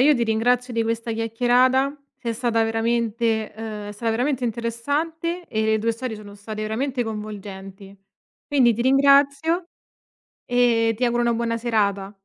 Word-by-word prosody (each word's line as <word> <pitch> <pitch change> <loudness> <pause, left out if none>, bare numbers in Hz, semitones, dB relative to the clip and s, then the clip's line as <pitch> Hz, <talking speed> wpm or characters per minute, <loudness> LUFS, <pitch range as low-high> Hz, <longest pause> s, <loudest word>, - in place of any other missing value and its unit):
io 295 +3 +6
ti 235 -2 +1
ringrazio 245 +3 +1
di 230 -1 +1
questa 230 0 -2
chiacchierata, 245 +4 +2 0.2
sei 235 -2 -3
stata 230 -1 0
veramente 225 -1 0
ehm, 215 -1 -6
è 205 - -6
stata 225 +2 -2
veramente 250 +3 0
interessante 290 +10 -2
e 220 0 -1
le 220 0 +2
tue 230 +2 0
storie 230 -1 -5
sono 205 -1 -11
state 215 +1 -7
veramente 245 +4 -2
coinvolgenti. 200 -2 -8 0.5
Quindi 260 -5 +4
ti 230 - -4
ringrazio 280 +5 +4 0.8
e 235 -2 +3
ti 250 - 0
auguro 240 0 +1
una 235 -1 +2
buona 230 0 -1
serata. 200 -4 0
230 Hz, 150 wpm, -23 LUFS, 220-250 Hz, 0.8 s, io